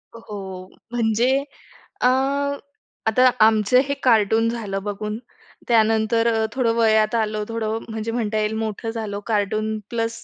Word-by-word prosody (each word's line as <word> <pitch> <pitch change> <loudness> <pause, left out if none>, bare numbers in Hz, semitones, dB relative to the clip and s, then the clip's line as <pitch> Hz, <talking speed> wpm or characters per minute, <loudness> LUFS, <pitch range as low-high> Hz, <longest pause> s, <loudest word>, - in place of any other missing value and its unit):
हो. 190 -4 -8 0.2
म्हणजे 240 +3 +2 0.6
अ, 250 - +5 1.0
आता 255 +4 +5 0.2
आमचं 220 +2 +4
हे 280 - 0
कार्टून 225 -1 +3
झालं 205 -4 -4
बघून 210 +1 -4 0.5
त्यानंतर 225 0 +3
अ, 220 0 +1
थोडं 245 -3 +1
वयात 220 -1 +3
आलो, 215 -2 0
थोडं 225 -1 -2
म्हणजे 220 0 -4
म्हणता 225 -2 -1
येईल 215 0 0
मोठं 220 +1 -3
झालो. 220 -3 -4
Cartoon 215 0 0
plus 230 -1 -3
220 Hz, 130 wpm, -22 LUFS, 215-230 Hz, 1.0 s, अ